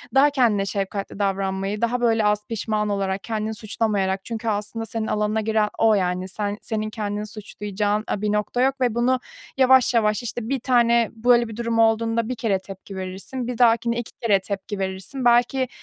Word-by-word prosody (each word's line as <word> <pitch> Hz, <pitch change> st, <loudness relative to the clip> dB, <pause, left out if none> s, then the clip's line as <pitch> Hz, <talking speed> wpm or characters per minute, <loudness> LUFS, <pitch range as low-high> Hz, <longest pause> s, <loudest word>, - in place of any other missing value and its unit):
Daha 280 Hz, +2 st, +6 dB
kendine 235 Hz, -8 st, +2 dB
şefkatli 195 Hz, 0 st, -4 dB
davranmayı, 195 Hz, +1 st, -1 dB
daha, 240 Hz, +1 st, 0 dB
böyle, 225 Hz, -2 st, +3 dB
az 210 Hz, 0 st, +1 dB
pişman 215 Hz, -1 st, -1 dB
olarak, 195 Hz, -1 st, -1 dB
kendini 220 Hz, -1 st, -2 dB
suçlamayarak 200 Hz, -3 st, -1 dB
çünkü 230 Hz, -1 st, -5 dB
aslında 210 Hz, +2 st, -3 dB
senin 225 Hz, -1 st, -3 dB
alanına 210 Hz, +1 st, 0 dB
giren 215 Hz, -1 st, +1 dB
o, 225 Hz, -1 st, +4 dB
yani. 180 Hz, -1 st, -1 dB
Sen 205 Hz, +1 st, -3 dB
senin 215 Hz, -1 st, -3 dB
kendini 210 Hz, -1 st, -4 dB
suçlayacağın, 210 Hz, 0 st, -3 dB
eee, 205 Hz, -, -2 dB
bir 210 Hz, -, 0 dB
nokta 210 Hz, +4 st, 0 dB
yok 270 Hz, +1 st, +1 dB
ve 245 Hz, -3 st, +1 dB
bunu 250 Hz, +2 st, +2 dB, 0.4 s
yavaş, 260 Hz, -1 st, +5 dB
yavaş, 215 Hz, 0 st, +2 dB
işte, 240 Hz, 0 st, -5 dB
1 270 Hz, -2 st, 0 dB
tane 235 Hz, -2 st, +3 dB
böyle 240 Hz, +1 st, +4 dB
bir 220 Hz, -, -8 dB
durum 230 Hz, -1 st, -1 dB
olduğunda 225 Hz, 0 st, +2 dB
1 255 Hz, -, -2 dB
kere 210 Hz, -5 st, 0 dB
tepki 195 Hz, 0 st, -10 dB
verirsin, 190 Hz, +7 st, -5 dB
bir 250 Hz, -, -4 dB
dahakine 235 Hz, 0 st, +3 dB
2 235 Hz, -, -6 dB
kere 205 Hz, -4 st, +3 dB
tepki 195 Hz, +1 st, -5 dB
verirsin, 190 Hz, +8 st, -4 dB
belki, 245 Hz, +2 st, +3 dB
220 Hz, 180 wpm, -23 LUFS, 205-235 Hz, 0.4 s, Daha